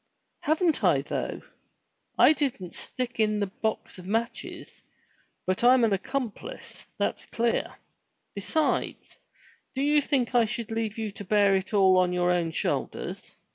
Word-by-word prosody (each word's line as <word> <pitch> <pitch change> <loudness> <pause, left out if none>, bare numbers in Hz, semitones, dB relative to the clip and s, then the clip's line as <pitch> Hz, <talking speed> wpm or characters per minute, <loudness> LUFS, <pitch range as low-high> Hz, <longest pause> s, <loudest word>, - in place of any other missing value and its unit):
"Haven't 320 +1 +1
I - - +4
though? - - -4 0.7
I - - +7
didn't 245 - -3
stick 245 -2 -5
in 215 -1 +2
the 205 - +1
box 220 -1 -4
of 180 - -10
matches, 230 +4 -3 0.6
but 185 +4 -1
I'm 250 0 +6
an 220 -3 +3
accomplice, 260 - -5
that's - - -2
clear. 235 0 -1 0.6
Besides, 315 -2 -1 0.6
do 265 - 0
you 295 +1 +4
think 260 -4 0
I 240 -2 +5
should 230 0 -4
leave 225 -1 -2
you 220 -2 -3
to 205 - -8
bear 200 0 +4
it 190 0 -2
all 190 -2 +6
on 180 -1 +2
your 180 0 +2
own 175 -2 +1
shoulders? 160 - -3
225 Hz, 145 wpm, -27 LUFS, 195-255 Hz, 0.7 s, I